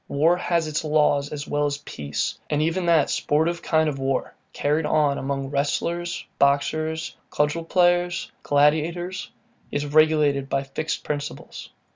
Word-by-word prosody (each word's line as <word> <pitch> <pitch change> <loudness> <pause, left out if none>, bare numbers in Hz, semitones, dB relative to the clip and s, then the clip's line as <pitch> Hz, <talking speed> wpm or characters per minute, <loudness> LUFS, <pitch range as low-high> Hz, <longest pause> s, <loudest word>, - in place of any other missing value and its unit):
War 160 +5 +3
has 170 -2 0
its 155 +1 -2
laws 150 -2 +2
as 145 -1 -5
well 145 0 +1
as 140 0 -2
peace; 75 - -4
and 150 - +1
even 165 +3 0
that 165 -4 +4
sportive 160 +3 0
kind 160 -1 +2
of 140 -3 -2
war, 135 -1 -1 0.2
carried 150 +2 0
on 145 -2 +2
among 135 0 -3
wrestlers, 170 +5 -1
boxers, 155 +3 +1
cudgel 150 +3 0
players, 175 0 +2
gladiators, 165 +7 +1 0.4
is 145 0 -2
regulated 150 -2 +3
by 135 0 0
fixed 150 +3 -4
principles. 145 0 -5
150 Hz, 140 wpm, -24 LUFS, 145-165 Hz, 0.4 s, that